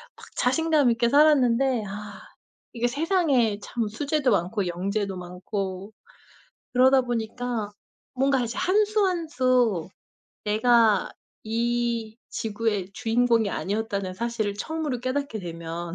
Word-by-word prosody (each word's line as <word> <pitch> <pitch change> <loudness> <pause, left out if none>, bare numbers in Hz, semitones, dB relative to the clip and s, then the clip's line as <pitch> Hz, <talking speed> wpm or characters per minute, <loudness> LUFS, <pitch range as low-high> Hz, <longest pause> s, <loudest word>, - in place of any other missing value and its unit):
막 - - -14
자신감 295 -1 +2
있게 235 0 +1
살았는데 265 -4 +4
아 205 +1 -8 0.5
이게 240 0 0
세상에 275 - +1
참 230 +2 -3
수재도 275 +4 0
많고 190 +1 0
영재도 195 +3 -2
많고 185 +2 -5 0.8
그러다 260 +1 +5
보니까 240 -2 -3 0.4
뭔가 270 0 +2
이제 235 0 -4
한 415 +3 +3
수 425 -1 +1
한 345 -4 -1
수 250 - +1 0.6
내가 220 -1 +3 0.3
이 235 0 -1
지구의 210 -3 -2
주인공이 230 -1 +2
아니었다는 200 -2 -2
사실을 220 -1 -2
처음으로 300 +3 -3
깨닫게 255 -2 -2
되면 170 -1 -6
230 Hz, 255 characters per minute, -25 LUFS, 205-260 Hz, 0.8 s, 그러다